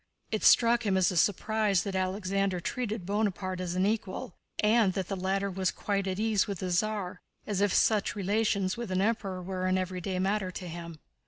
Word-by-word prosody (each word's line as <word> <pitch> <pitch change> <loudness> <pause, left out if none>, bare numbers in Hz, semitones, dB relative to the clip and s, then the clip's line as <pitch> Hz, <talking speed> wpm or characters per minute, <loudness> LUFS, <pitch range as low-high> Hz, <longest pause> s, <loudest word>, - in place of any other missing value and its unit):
It 215 - -1
struck 235 0 +5
him 195 -3 +1
as 185 -1 +3
a - - -4
surprise 205 +1 +2
that 200 - -4
Alexander 190 0 0
treated 220 0 -3
Bonaparte 195 -2 -1
as 180 -1 -3
an 185 +1 +2
equal 205 -4 -2 0.3
and 215 -2 +4
that 190 -2 -3
the 195 - -1
latter 195 +1 -1
was 190 0 0
quite 200 -1 -2
at 185 -1 -2
ease 215 -2 +2
with 200 -2 -3
the 180 +1 -3
Tsar, 195 -1 -1 0.2
as 200 -2 -1
if 205 -1 +3
such 210 +1 +2
relations 200 -1 +1
with 235 -3 -5
an 185 0 0
Emperor 195 -4 -1
were 185 0 -2
an 185 0 +2
everyday 185 0 -3
matter 195 +1 0
to 180 0 -7
him. 170 -1 -7
195 Hz, 195 wpm, -29 LUFS, 185-210 Hz, 0.3 s, struck